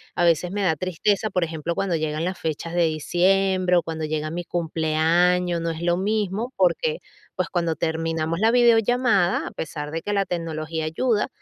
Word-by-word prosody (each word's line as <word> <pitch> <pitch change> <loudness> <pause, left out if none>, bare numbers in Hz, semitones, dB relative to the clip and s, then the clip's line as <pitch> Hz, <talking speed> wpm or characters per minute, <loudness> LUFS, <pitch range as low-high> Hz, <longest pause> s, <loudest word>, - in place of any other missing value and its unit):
A - - +1
veces, 170 +1 +2
me 205 +1 -2
da 170 -4 +2
tristeza, 185 +6 0
por 180 -2 +1
ejemplo, 165 0 -3
cuando 185 -2 0
llegan 155 0 -2
las 185 0 -3
fechas 160 +1 -4
de 175 - +3
diciembre, 180 +3 +2
o, 170 - +2
cuando 160 -1 -4
llega 155 0 -2
mi 175 +2 -4
cumpleaños. 170 +2 +1
No 165 - -1
es 160 0 -7
lo 175 0 +2
mismo, 210 +3 -1
porque, 460 - +1 0.4
pues, - - -2
cuando 170 -2 -1
terminamos 165 0 -2
la 220 +2 +4
videollamada, 235 -4 +3
a - - -6
pesar 150 -2 -5
de 165 +1 -3
que 205 - -2
la 200 -1 +1
tecnología 160 -2 -3
ayuda, 210 +8 0
175 Hz, 185 wpm, -23 LUFS, 160-195 Hz, 0.4 s, la